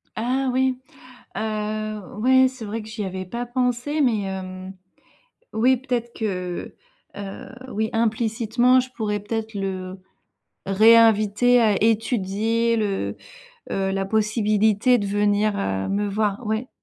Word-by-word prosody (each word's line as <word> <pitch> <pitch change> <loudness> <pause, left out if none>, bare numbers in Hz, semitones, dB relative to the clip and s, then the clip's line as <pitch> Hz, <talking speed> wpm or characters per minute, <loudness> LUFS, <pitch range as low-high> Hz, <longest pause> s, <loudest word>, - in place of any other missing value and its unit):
Ah 255 +4 0
oui, 260 0 +1 0.6
heu, 215 0 -3 0.2
ouais, 260 +3 +5
c'est 255 -3 -8
vrai 220 +2 -4
que 215 - -11
j'y 220 -1 -5
avais 190 -1 -5
pas 235 +6 -4
pensé. 250 +4 -1
Mais 235 -6 +2
hem, 190 -1 -6 0.8
oui, 250 +4 +3
peut-être 240 -2 -3
que, 180 -5 -4 0.4
heu, 200 -1 -7 0.2
oui, 220 -1 -2
implicitement, 230 +2 +2
je 255 0 -7
pourrais 210 -3 -2
peut-être 220 +1 -4
le 190 -1 -4 0.7
réinviter 220 +3 +5
à 210 -4 +2
étudier 225 +1 +1
le, 195 - -2 0.5
heu, 195 0 -1
la 195 0 -1
possibilité 215 +2 +2
de 205 - -2
venir, 205 +1 +1
heu, 95 0 -2
me 205 +1 -1
voir, 210 +2 -1
ouais. 220 +4 -2
215 Hz, 130 wpm, -23 LUFS, 200-235 Hz, 0.8 s, ouais